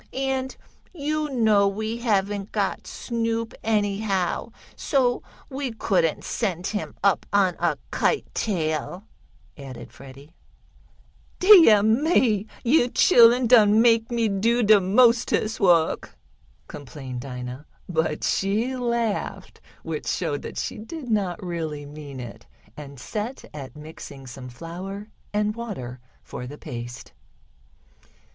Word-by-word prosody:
And 265 Hz, 0 st, -2 dB, 0.4 s
you 305 Hz, -1 st, -2 dB
know 220 Hz, -6 st, +3 dB
we 220 Hz, +3 st, -3 dB
haven't 205 Hz, -3 st, -1 dB
got 200 Hz, -3 st, -2 dB
Snoop, 230 Hz, -1 st, -3 dB
anyhow, 205 Hz, -2 st, 0 dB, 0.2 s
so 250 Hz, -3 st, +1 dB, 0.3 s
we 265 Hz, -2 st, -4 dB
couldn't 185 Hz, -8 st, 0 dB
send 185 Hz, -6 st, -2 dB
him 210 Hz, +1 st, -3 dB
up 200 Hz, -1 st, +2 dB
on 195 Hz, -3 st, +3 dB
a 170 Hz, -4 st, +1 dB
kite -, -, +1 dB
tail," 170 Hz, -2 st, -2 dB, 0.5 s
added 135 Hz, -4 st, -10 dB
Freddie. 140 Hz, +3 st, -14 dB, 1.0 s
"Deah 335 Hz, -, +8 dB
me! 220 Hz, -, +2 dB, 0.2 s
Yo' 245 Hz, 0 st, +4 dB
chilluns 240 Hz, 0 st, +5 dB
done 215 Hz, -3 st, +6 dB
make 230 Hz, 0 st, +4 dB
me 235 Hz, -2 st, +1 dB
do 230 Hz, +4 st, +1 dB
de 210 Hz, -1 st, +6 dB
mostest 230 Hz, +2 st, +3 dB
wuk!" 170 Hz, -5 st, +2 dB, 0.5 s
complained 130 Hz, -3 st, -8 dB
Dinah, 125 Hz, +2 st, -7 dB, 0.2 s
but 160 Hz, -3 st, -1 dB
she 220 Hz, +7 st, 0 dB
laughed, 235 Hz, -4 st, -2 dB, 0.2 s
which -, -, -5 dB
showed -, -, -1 dB
that -, -, -8 dB
she -, -, -4 dB
did 245 Hz, +3 st, -7 dB
not 195 Hz, -5 st, 0 dB
really 160 Hz, -4 st, -4 dB
mean 145 Hz, -2 st, -9 dB
it, 120 Hz, -2 st, -9 dB, 0.3 s
and 140 Hz, -3 st, -10 dB
set 215 Hz, -, -5 dB
at 140 Hz, -1 st, -8 dB
mixing 150 Hz, -3 st, -10 dB
some 125 Hz, 0 st, -9 dB
flour 185 Hz, -, -8 dB, 0.2 s
and 210 Hz, 0 st, 0 dB
water 155 Hz, -, -6 dB, 0.2 s
for 125 Hz, -, -7 dB
the 145 Hz, +3 st, -9 dB
paste. 120 Hz, -2 st, -8 dB
205 Hz, 120 wpm, -24 LUFS, 155-235 Hz, 1.0 s, Deah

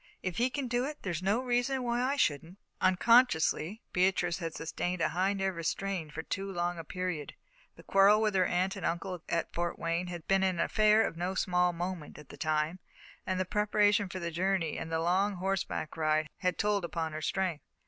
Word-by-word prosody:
If 185 Hz, -2 st, -3 dB
he 245 Hz, +2 st, +2 dB
can 270 Hz, 0 st, -3 dB
do 245 Hz, +1 st, 0 dB
it, 300 Hz, +1 st, -5 dB
there's 175 Hz, -4 st, -2 dB
no 200 Hz, +6 st, +1 dB
reason 250 Hz, +1 st, 0 dB
why 240 Hz, 0 st, 0 dB
I 265 Hz, +3 st, +1 dB
shouldn't." 165 Hz, -, 0 dB, 0.2 s
Unconsciously, 190 Hz, -2 st, +3 dB
Beatrice 180 Hz, -1 st, +2 dB
had 165 Hz, -2 st, -4 dB
sustained 175 Hz, +2 st, -3 dB
a -, -, +2 dB
high 190 Hz, +3 st, +1 dB
nervous 190 Hz, -4 st, -1 dB
strain 195 Hz, -5 st, -3 dB
for 160 Hz, +2 st, -6 dB
too 195 Hz, +2 st, -4 dB
long 175 Hz, -1 st, -2 dB
a -, -, -5 dB
period. 180 Hz, -3 st, -4 dB, 0.4 s
The -, -, -15 dB
quarrel 200 Hz, +2 st, +5 dB
with 215 Hz, -1 st, +1 dB
her 185 Hz, -2 st, +3 dB
aunt 185 Hz, +2 st, 0 dB
and 195 Hz, -, -7 dB
uncle 175 Hz, +1 st, -2 dB
at 170 Hz, -1 st, -1 dB
Fort 175 Hz, 0 st, -2 dB
Wayne 170 Hz, +2 st, -1 dB
had 175 Hz, -2 st, -7 dB
been 195 Hz, 0 st, +3 dB
an 185 Hz, -3 st, +1 dB
affair 215 Hz, +3 st, +4 dB
of -, -, -4 dB
no 180 Hz, +2 st, -2 dB
small 180 Hz, -1 st, +2 dB
moment 175 Hz, -2 st, -5 dB
at 150 Hz, -, -13 dB
the -, -, -10 dB
time, 155 Hz, +3 st, 0 dB, 0.5 s
and 185 Hz, 0 st, 0 dB
the 185 Hz, -, +1 dB
preparation 210 Hz, +1 st, +2 dB
for 185 Hz, -, -6 dB
the 170 Hz, -2 st, -3 dB
journey 180 Hz, -1 st, 0 dB
and 165 Hz, -, -5 dB
the 160 Hz, -, 0 dB
long 190 Hz, +4 st, +1 dB
horseback 190 Hz, -3 st, -2 dB
ride 155 Hz, -1 st, +1 dB
had 180 Hz, -2 st, 0 dB
told 205 Hz, -2 st, +1 dB
upon 165 Hz, -2 st, -3 dB
her 155 Hz, -, -4 dB
strength. 180 Hz, -2 st, -1 dB
185 Hz, 205 wpm, -31 LUFS, 170-200 Hz, 0.5 s, quarrel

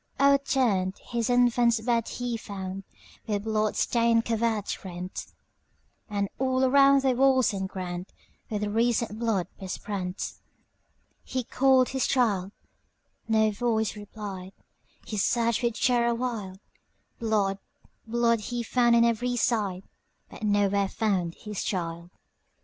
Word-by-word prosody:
O'erturned 260 Hz, -9 st, +2 dB
his 235 Hz, -1 st, -3 dB
infant's 240 Hz, -1 st, +3 dB
bed 230 Hz, 0 st, 0 dB
he 245 Hz, -1 st, -3 dB
found, 195 Hz, -3 st, -6 dB, 0.4 s
With 205 Hz, -2 st, -1 dB
blood 215 Hz, -1 st, 0 dB
stained 230 Hz, -1 st, +2 dB
covert 225 Hz, -2 st, -1 dB
rent; 180 Hz, -1 st, -6 dB, 0.8 s
And 200 Hz, -1 st, -1 dB
all 260 Hz, 0 st, +1 dB
around 275 Hz, +1 st, +5 dB
the 265 Hz, -, +3 dB
walls 260 Hz, -2 st, +3 dB
and 190 Hz, -1 st, -3 dB
groundWith 190 Hz, +3 st, -6 dB
recent 230 Hz, -1 st, +1 dB
blood 220 Hz, -6 st, 0 dB
besprent. 190 Hz, -1 st, -4 dB, 0.9 s
He 255 Hz, -1 st, -3 dB
called 260 Hz, +1 st, +3 dB
his 265 Hz, 0 st, 0 dB
child,—no 220 Hz, 0 st, -1 dB
voice 220 Hz, 0 st, 0 dB
replied,—He 205 Hz, 0 st, -9 dB
searched 235 Hz, +3 st, +1 dB
with 235 Hz, -2 st, -1 dB
terror 235 Hz, -2 st, +2 dB
wild; 220 Hz, -6 st, -4 dB, 0.6 s
Blood, 205 Hz, -4 st, 0 dB, 0.5 s
blood, 235 Hz, 0 st, +2 dB
he 235 Hz, +3 st, -4 dB
found 240 Hz, 0 st, +3 dB
on 235 Hz, 0 st, +5 dB
every 245 Hz, +2 st, 0 dB
side, 205 Hz, -6 st, 0 dB, 0.5 s
But -, -, -11 dB
nowhere 205 Hz, -1 st, +2 dB
found 185 Hz, -7 st, -1 dB
his 210 Hz, -2 st, -5 dB
child. 170 Hz, -2 st, -3 dB
220 Hz, 115 wpm, -27 LUFS, 200-240 Hz, 0.9 s, around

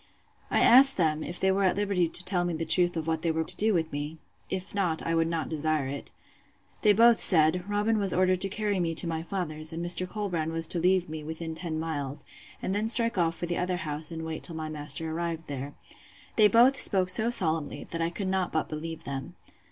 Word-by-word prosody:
I -, -, +1 dB
asked 270 Hz, +3 st, +6 dB
them, 155 Hz, -3 st, 0 dB
if 175 Hz, -, -6 dB
they 190 Hz, -, +2 dB
were 195 Hz, +1 st, 0 dB
at 185 Hz, -, +2 dB
liberty 200 Hz, -4 st, 0 dB
to 175 Hz, +2 st, +2 dB
tell 180 Hz, -1 st, +2 dB
me 175 Hz, -1 st, -3 dB
the 165 Hz, +1 st, -4 dB
truth 175 Hz, +1 st, +1 dB
of 160 Hz, -, -3 dB
what 160 Hz, -1 st, -2 dB
they 170 Hz, -, -1 dB
were 160 Hz, 0 st, -1 dB
to -, -, +3 dB
do 220 Hz, +1 st, +2 dB
with 165 Hz, -4 st, -1 dB
me? 145 Hz, +2 st, -6 dB, 0.3 s
If 185 Hz, -1 st, -5 dB
not, 180 Hz, -6 st, -2 dB
I 165 Hz, -, -2 dB
would 165 Hz, 0 st, +1 dB
not 165 Hz, -1 st, -3 dB
desire 155 Hz, -2 st, -1 dB
it.—They 140 Hz, +8 st, -5 dB
both 230 Hz, +2 st, +5 dB
said, 175 Hz, +2 st, +5 dB
Robin 210 Hz, +2 st, 0 dB
was 195 Hz, -2 st, +1 dB
ordered 185 Hz, 0 st, +1 dB
to 195 Hz, -, +5 dB
carry 205 Hz, -1 st, -2 dB
me 165 Hz, -2 st, -2 dB
to 175 Hz, -, +4 dB
my 165 Hz, -1 st, -3 dB
father's; 160 Hz, -3 st, -2 dB
and 165 Hz, +1 st, -5 dB
Mr. 180 Hz, +1 st, +2 dB
Colbrand 180 Hz, -6 st, -4 dB
was 165 Hz, 0 st, +1 dB
to 175 Hz, -, +2 dB
leave 180 Hz, +1 st, +1 dB
me 155 Hz, -1 st, -7 dB
within 160 Hz, +1 st, -6 dB
ten 160 Hz, -1 st, -5 dB
miles, 145 Hz, -4 st, -5 dB, 0.4 s
and 190 Hz, -, -2 dB
then 210 Hz, +2 st, -1 dB
strike 230 Hz, -2 st, +1 dB
off 165 Hz, -1 st, 0 dB
for 175 Hz, -, -5 dB
the 175 Hz, 0 st, -3 dB
other 180 Hz, 0 st, -2 dB
house, 155 Hz, -3 st, -4 dB
and 160 Hz, -1 st, -7 dB
wait 160 Hz, -1 st, -6 dB
till 165 Hz, -, -5 dB
my 155 Hz, -1 st, -5 dB
master 150 Hz, +1 st, -3 dB
arrived 165 Hz, 0 st, -4 dB
there. 140 Hz, 0 st, -7 dB, 0.6 s
They 215 Hz, -2 st, +6 dB
both 245 Hz, +5 st, +4 dB
spoke 185 Hz, -2 st, +7 dB
so 220 Hz, +5 st, +3 dB
solemnly, 160 Hz, -9 st, -1 dB
that 165 Hz, -, -3 dB
I 165 Hz, -, 0 dB
could 190 Hz, +3 st, -5 dB
not 190 Hz, -1 st, -1 dB
but 160 Hz, -, -2 dB
believe 160 Hz, +1 st, -7 dB
them. 135 Hz, -1 st, -7 dB
170 Hz, 230 wpm, -27 LUFS, 160-190 Hz, 0.6 s, spoke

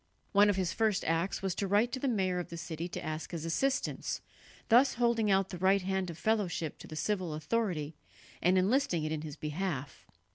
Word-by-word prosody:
One 205 Hz, +1 st, +6 dB
of 205 Hz, -, +2 dB
his 185 Hz, -2 st, 0 dB
first 220 Hz, -3 st, +1 dB
acts 165 Hz, +5 st, 0 dB
was 190 Hz, -2 st, 0 dB
to 200 Hz, +2 st, -2 dB
write 210 Hz, +5 st, +3 dB
to 260 Hz, -, -3 dB
the 275 Hz, -, -1 dB
mayor 190 Hz, -7 st, +1 dB
of 175 Hz, -, -5 dB
the 170 Hz, -, -6 dB
city 165 Hz, 0 st, -4 dB
to -, -, -6 dB
ask 155 Hz, 0 st, -4 dB
his 165 Hz, -2 st, -5 dB
assistance, 270 Hz, +12 st, -1 dB, 0.5 s
thus 250 Hz, +4 st, +5 dB
holding 235 Hz, -3 st, +2 dB
out 195 Hz, -1 st, +3 dB
the 180 Hz, -, -6 dB
right 190 Hz, +1 st, +3 dB
hand 190 Hz, -1 st, -1 dB
of 165 Hz, -, -7 dB
fellowship 185 Hz, -8 st, -1 dB
to -, -, -10 dB
the 155 Hz, -, -8 dB
civil 180 Hz, -1 st, -1 dB
authority, 160 Hz, -3 st, -1 dB, 0.5 s
and 180 Hz, +2 st, +4 dB
enlisting 190 Hz, -, +2 dB
it 155 Hz, -, -2 dB
in 155 Hz, -1 st, -2 dB
his 150 Hz, -2 st, -6 dB
behalf. 150 Hz, -3 st, -4 dB
185 Hz, 210 wpm, -31 LUFS, 165-210 Hz, 0.5 s, One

